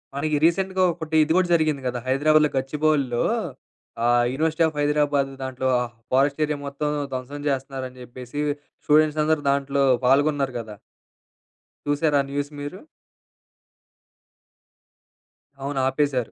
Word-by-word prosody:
మనకి 150 +1 0
రీసెంట్‌గా 190 +2 +1
ఒకటి 160 -1 -5
ఇది 155 - -2
కూడా 185 - +3
జరిగింది 155 -4 +2
కదా! 125 0 -2
హైదరాబాద్‌లో 150 +3 +3
గచ్చిబౌలీలో 140 -2 0 0.8
ఆహ్, 120 0 +4
యూనివర్సిటీ 160 +3 +1
ఆఫ్ 155 - -6
హైదరాబాదు 145 -2 +1
దాంట్లో 130 0 -3
ఆ - - 0 0.3
ఫారెస్ట్ 140 +3 +2
ఏరియా 150 -1 -3
మొత్తం 140 +2 -3 0.2
ధ్వంసం 130 +3 -5
చేస్తరని 130 -1 -4
చెప్పేసి 125 +3 -8 0.5
స్టూడెంట్స్ 155 0 +3
అందరూ 155 0 +1
దాంట్లో 140 0 +1 0.2
పాల్గొన్నారు 140 0 +2
కదా! 110 -2 -8 1.1
చూసారా 145 0 +2
ఆ - - -9
న్యూస్ 145 +1 -3
మీరు? 145 +6 -6 2.8
అవును. 140 0 -3
ఆపేశారు. 135 -3 -1
145 Hz, 120 wpm, -23 LUFS, 130-155 Hz, 2.8 s, ఆహ్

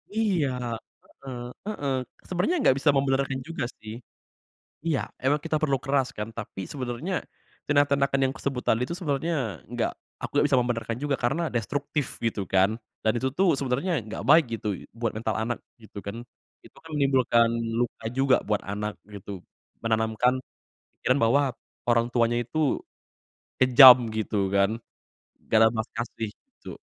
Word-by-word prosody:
Iya. 195 -10 +2 0.6
Heeh 130 -3 -9 0.3
heeh. 140 -11 -1 0.3
Sebenernya 185 - 0
gak 130 - +6
bisa 145 - +3
membenarkan 135 -1 +1
juga, 165 -6 -4 0.2
sih. 110 +1 -8 0.9
Iya, 150 -4 +2 0.2
emang 145 +3 +3
kita 155 -1 +1
perlu 140 -3 +2
keras, 135 -1 +1
kan, 105 +1 -3
tapi 100 -4 -6
sebenernya 130 +6 -4 0.5
tindak-tindakan 140 -1 +3
yang 130 - -1
kusebut 135 -3 -3
tadi 115 +2 +2
itu, 170 - -4
sebenernya 160 0 -1 0.4
gak - - +1 0.3
aku - - -5
nggak 145 - +4
bisa 130 -3 +4
membenarkan 115 -1 -2
juga. 145 -2 +1
Karena 135 +8 0
destruktif 140 +5 -2
gitu, 110 -3 0
kan, 95 +4 +3 0.3
dan 110 - +5
itu, 130 - 0
tuh, 190 -1 +4
sebenernya 140 +7 -1 0.2
gak 100 - -5
baik, 160 -1 +7
gitu, 105 - -6 0.3
buat 115 -1 -1
mental 110 0 -2
anak 120 +2 -1 0.3
gitu, 105 - -9
kan. 115 +4 -6 0.4
Itu, - - -17
kan, 160 - -14
menimbulkan 130 -4 +3 0.3
luka 120 -2 -2
juga 135 -1 +4
buat 105 - +1
anak, 105 +1 -3 0.2
gitu. 100 -2 -8 0.4
Menanamkan 110 +3 +1 0.6
pikiran 130 +2 +2
bahwa 140 +6 +4 0.5
orang 115 0 +3
tuanya 120 -1 +2
itu 150 +3 0 0.8
kejam 130 0 +10
gitu, 105 -3 -1
kan. 100 +1 +3 0.8
Gak 110 - +5
ada - - +7
belas 110 0 -3
kasih, 115 -2 -3 0.2
gitu. - - -10
130 Hz, 150 wpm, -26 LUFS, 115-140 Hz, 0.9 s, kejam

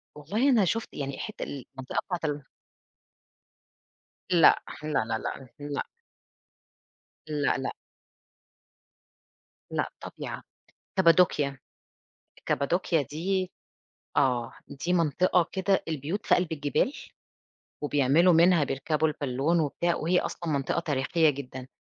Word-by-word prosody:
والله 210 - 0
أنا 225 -7 +5
شٌفت 225 +6 -1
يعني 140 -1 -4
حتّة 215 - -5
المنطقة 130 -1 -5
بتاعة 180 - 0
ال 145 -1 -7 1.8
لأ، 175 -3 +6 0.2
لا، 155 - -3 0.2
لا، 110 0 -1
لا، 130 +2 -6
لأ. 145 0 -3 1.4
لأ، 150 -1 +1
لأ. 135 - -3 2.0
لأ، - - -1
طبيعة. - - -7 0.5
كابادوكيا، 165 -6 +4 0.9
كابادوكيا 165 +2 +1
دي 180 +6 -2 0.7
آه 125 -4 +2 0.2
دي 170 +6 -3
منطقة 175 +1 +3
كده 190 0 +1
البيوت 160 +5 -3
في - - +5
قَلب 180 -2 -1
الجبال، 150 - 0 0.9
وبيعملوا 145 +5 +4
منها 170 -1 +5
بيركبوا 150 +4 0
البالّون 145 +3 0
وبتاع، 170 +3 0
وهي 175 +3 +2
أصلًا 170 - -4
منطقة 140 +4 0
تاريخية 155 +1 +2
جدًا. 130 -2 -6
155 Hz, 105 wpm, -28 LUFS, 140-175 Hz, 2.0 s, لأ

